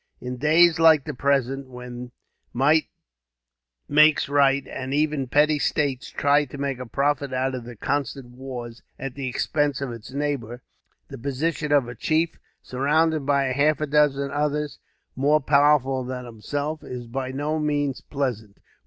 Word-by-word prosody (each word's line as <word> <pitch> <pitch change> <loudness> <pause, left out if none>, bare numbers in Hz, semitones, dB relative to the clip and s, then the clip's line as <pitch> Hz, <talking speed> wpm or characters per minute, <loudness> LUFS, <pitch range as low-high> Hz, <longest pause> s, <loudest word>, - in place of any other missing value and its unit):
In 125 0 -6
days 160 +4 +4
like 160 -3 +6
the 150 - -4
present, 135 0 0
when 125 0 -8 0.4
might 150 +5 +3 1.0
makes 155 +1 +5
right, 140 -1 +3
and 130 +1 -4
every 150 -3 0
petty 150 +3 +3
state 140 -4 -1
tries 145 +1 +3
to 140 - -9
make 140 -2 -3
profit 140 -1 0
out 130 +1 0
of 125 -2 -5
the 120 0 -9
constant 135 +1 -3
wars, 125 -2 -8 0.2
at 135 -1 -5
the 135 -1 -4
expense 145 +2 0
of 135 -3 -4
its 115 -2 -9
neighbour, 130 -4 -3 0.5
the - - -9
position 145 +4 -2
of 140 -4 +3
a 120 - -6
chief, 160 +7 0 0.2
surrounded 150 +3 +1
by 140 -1 +3
half 145 +2 +2
a 155 - 0
dozen 140 -1 +2
others 150 0 -2 0.4
more 145 +3 +3
powerful 140 -2 +3
than 125 0 -5
himself, 145 +7 -4
is 125 -1 -7
by 130 +2 -4
no 150 +3 -2
means 145 -3 -1
pleasant. 120 -8 -4
140 Hz, 155 wpm, -24 LUFS, 130-150 Hz, 1.0 s, like